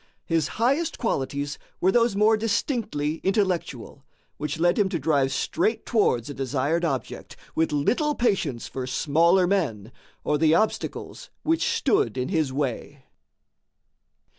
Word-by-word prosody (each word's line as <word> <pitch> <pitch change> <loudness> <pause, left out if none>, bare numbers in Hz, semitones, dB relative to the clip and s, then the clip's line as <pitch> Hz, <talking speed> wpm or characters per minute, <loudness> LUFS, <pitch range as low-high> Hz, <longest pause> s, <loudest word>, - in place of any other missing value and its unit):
His 165 -3 +1
highest 275 +8 +1
qualities 145 - -2 0.2
were 185 - +3
those 235 -2 +2
more 215 +2 +4
distinctly 215 - -1
intellectual, 185 - -1 0.3
which 150 +1 -3
led 175 +3 +2
him 200 -2 +3
to 185 - -1
drive 140 -3 +1
straight 220 +9 -1
towards 125 - +1
a 145 - -5
desired 140 +5 -1
object, 135 -6 -3 0.2
with 160 0 +1
little 250 - +1
patience 170 - 0
for 130 -1 -5
smaller 165 +7 +3
men 135 - -1 0.3
or 150 -1 0
the 160 0 +4
obstacles 215 +4 -2
which 325 +1 +1
stood 410 - +1
in 125 - -2
his 160 -7 0
way. 135 0 -4
165 Hz, 135 wpm, -25 LUFS, 140-215 Hz, 0.3 s, more